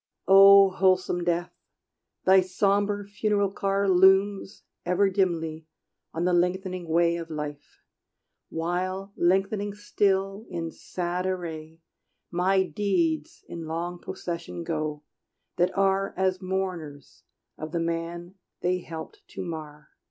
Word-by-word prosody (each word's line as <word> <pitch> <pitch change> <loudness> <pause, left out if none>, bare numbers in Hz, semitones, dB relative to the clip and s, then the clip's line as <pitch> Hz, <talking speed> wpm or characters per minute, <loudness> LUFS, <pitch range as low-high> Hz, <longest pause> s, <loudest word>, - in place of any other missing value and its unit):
O 195 0 +8
Wholesome 185 -1 +2
Death, 175 0 -1 0.7
thy 190 0 +7
sombre 200 +2 0
funeral 205 -1 0
car 195 0 0
Looms 190 +2 +3 0.2
ever 190 +3 +2
dimly 165 -5 -1 0.4
on 165 +2 -2
the 180 - +2
lengthening 180 0 0
way 170 +1 +3
Of 165 -1 -7
life; 150 -2 -7 0.7
while, 185 +4 -3
lengthening 195 +3 +1
still, 200 0 0
in 165 -2 -4
sad 180 +2 -4
array, 165 -3 -5 0.5
My 190 +2 +2
deeds 170 -4 -1
in 165 -2 -7
long 170 +2 -4
procession 170 -2 -6
go, 155 -2 -3 0.5
that 180 +1 +2
are 195 0 +1
As 185 -1 0
mourners 185 -7 -4 0.3
of 155 0 -7
the 170 - -1
man 170 +1 -3 0.3
they 180 +1 +1
helped 170 - -9
to - - -4
mar. 155 -3 -8
180 Hz, 115 wpm, -26 LUFS, 165-195 Hz, 0.7 s, O